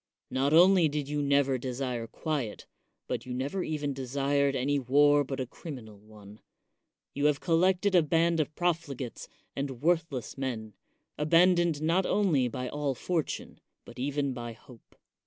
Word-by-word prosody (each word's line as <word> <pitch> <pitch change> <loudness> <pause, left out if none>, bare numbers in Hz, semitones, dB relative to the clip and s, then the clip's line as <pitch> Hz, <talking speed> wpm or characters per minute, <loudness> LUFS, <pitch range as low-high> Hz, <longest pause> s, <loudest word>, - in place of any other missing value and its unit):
Not 135 +2 +1
only 175 0 +6
did 145 -1 -3
you 145 0 -1
never 140 -2 +2
desire 125 -2 -3
quiet, 140 -5 -4 0.4
but 125 0 -4
you 125 - -4
never 140 +9 -2
even 150 -2 -2
desired 140 +1 0
any 140 +2 +1
war 145 +3 +4
but 135 0 -5
a 130 - -1
criminal 120 -6 -10
one; 105 0 -15 0.7
you 145 +1 -1
have 145 -2 +1
collected 185 +3 +2
a 180 - +6
band 165 +2 +2
of 155 0 -1
profligates 155 -8 -2 0.3
and 135 -2 -4
worthless 160 -7 0
men, 110 -5 -4 0.5
abandoned 170 0 +3
not 175 +4 +2
only 165 -12 +2
by 125 +2 -4
all 145 0 -2
fortune 165 +3 -3 0.3
but - - -12
even 140 +1 -1
by 120 -2 -6
hope. 115 +1 -18
140 Hz, 150 wpm, -29 LUFS, 130-160 Hz, 0.7 s, only